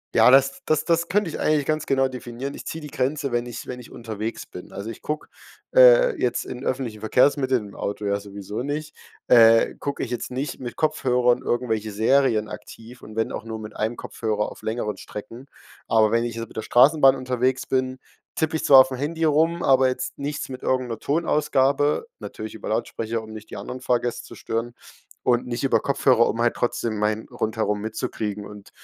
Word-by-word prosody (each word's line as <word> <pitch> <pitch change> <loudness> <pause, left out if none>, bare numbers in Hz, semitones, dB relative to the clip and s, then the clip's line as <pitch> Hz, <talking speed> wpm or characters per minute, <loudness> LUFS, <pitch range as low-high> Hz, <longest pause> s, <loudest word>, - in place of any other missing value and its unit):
ja, - - +7
das 135 +1 +4
das 155 - +1
das 170 0 +1
könnte 200 -1 +1
ich - - -5
eigentlich 150 -2 +2
ganz 155 0 -1
genau 135 -1 +2
definieren. 130 +1 -6
Ich - - -9
ziehe 160 - -5
die 150 - -7
Grenze, 140 +1 -1
wenn 120 0 0
ich 120 -2 -8
wenn 125 - -6
ich 120 - -14
unterwegs 110 -1 -5
bin. 90 - -11
Also, 100 +3 -6
ich 115 - -9
gucke, 150 0 -4 0.5
äh, - - +7
jetzt 120 - 0
in 125 +1 -7
öffentlichen 120 -5 -3
Verkehrsmitteln, 130 0 +2
im 100 - -13
Auto 105 +1 -4
ja 100 0 +1
sowieso 100 +2 -6
nicht, 150 +2 -4 0.3
äh, 115 -1 +6
gucke 140 -1 -4
ich - - -5
jetzt 120 - -4
nicht 135 +3 -4
mit 120 -2 -6
Kopfhörern 125 -6 +2
irgendwelche 110 -3 -1
Serien 110 0 +2
aktiv 115 +4 -11
und 110 0 -11
wenn 110 - -1
auch - - -5
nur 110 -1 -6
mit 105 -1 -9
einem 110 +2 -2
Kopfhörer 105 -2 -2
auf - - -13
längeren 110 -2 -2
Strecken. 115 +7 -9 0.4
Aber 110 -1 +4
wenn 115 0 +2
ich 120 -1 -4
jetzt 115 0 -5
mit - - -18
der 110 - -1
Straßenbahn 135 +3 +5
unterwegs 130 0 -1
bin, 130 0 -1 0.4
tippe 160 0 0
ich 160 - -2
zwar 135 -2 +9
aufm 130 0 +4
Handy 160 +5 -2
rum, 160 +3 +2
aber 130 -1 +4
jetzt 130 0 -4
nichts 145 +1 -4
mit 130 -1 -8
irgend 130 -1 0
'ner 115 -2 -4
Tonausgabe, 145 - +1
natürlich 110 0 -7
über 110 - -7
Lautsprecher, 115 +1 -2
um 110 0 -11
nicht 110 0 -10
die - - -6
anderen 125 +6 -7
Fahrgäste 120 -1 -1
zu - - -12
stören 115 +1 -3 0.5
und 120 -1 +2
nicht 120 +2 -3
über 135 - +3
Kopfhörer, 130 -4 +3
um 115 - -2
halt 120 0 +3
trotzdem 115 -2 -1
mein 105 +1 0
Rundherum 110 -2 -1
mitzukriegen 105 -1 -4
und, 105 -1 -12
125 Hz, 200 wpm, -24 LUFS, 110-140 Hz, 0.5 s, zwar